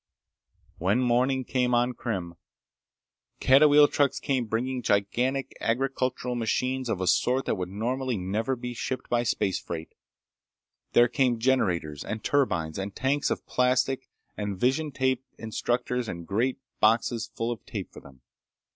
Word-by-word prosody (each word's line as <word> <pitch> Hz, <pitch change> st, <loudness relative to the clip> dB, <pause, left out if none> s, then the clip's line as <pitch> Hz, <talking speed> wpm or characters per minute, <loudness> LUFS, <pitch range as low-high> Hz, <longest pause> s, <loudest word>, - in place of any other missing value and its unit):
When 95 Hz, +7 st, +2 dB
morning 130 Hz, +1 st, +2 dB
came 125 Hz, -1 st, +1 dB
on 120 Hz, +1 st, +2 dB
Krim, 95 Hz, -8 st, -4 dB, 1.1 s
catawheel 145 Hz, +2 st, +7 dB
trucks 140 Hz, -2 st, +1 dB
came 130 Hz, -3 st, -1 dB
bringing 125 Hz, +4 st, -1 dB
gigantic 125 Hz, +7 st, 0 dB
agricultural 130 Hz, +1 st, -1 dB
machines 125 Hz, +2 st, -1 dB
of 95 Hz, -5 st, -1 dB
a -, -, 0 dB
sort 125 Hz, +9 st, +2 dB
that -, -, +1 dB
would 90 Hz, -1 st, -3 dB
normally 125 Hz, +4 st, -2 dB
never 105 Hz, +8 st, -1 dB
be 125 Hz, 0 st, -6 dB
shipped 130 Hz, +2 st, -4 dB
by 120 Hz, -1 st, +3 dB
space 105 Hz, -5 st, 0 dB
freight. 80 Hz, -1 st, -7 dB, 1.0 s
There 120 Hz, 0 st, +6 dB
came 125 Hz, -1 st, +1 dB
generators 90 Hz, -, 0 dB
and 110 Hz, 0 st, -5 dB
turbines 85 Hz, -, 0 dB
and 95 Hz, +1 st, -5 dB
tanks 140 Hz, +2 st, +1 dB
of -, -, -3 dB
plastic, 125 Hz, +1 st, +1 dB, 0.3 s
and 105 Hz, -2 st, -3 dB
vision 135 Hz, +6 st, +1 dB
tape 130 Hz, -1 st, 0 dB
instructors 120 Hz, +2 st, -2 dB
and 85 Hz, 0 st, -6 dB
great 115 Hz, +8 st, 0 dB, 0.2 s
boxes 115 Hz, +1 st, +2 dB
full 115 Hz, +1 st, -1 dB
of 120 Hz, -, -6 dB
tape 100 Hz, -4 st, -6 dB
for -, -, -10 dB
them. 65 Hz, -2 st, -17 dB
120 Hz, 145 wpm, -27 LUFS, 105-130 Hz, 1.1 s, catawheel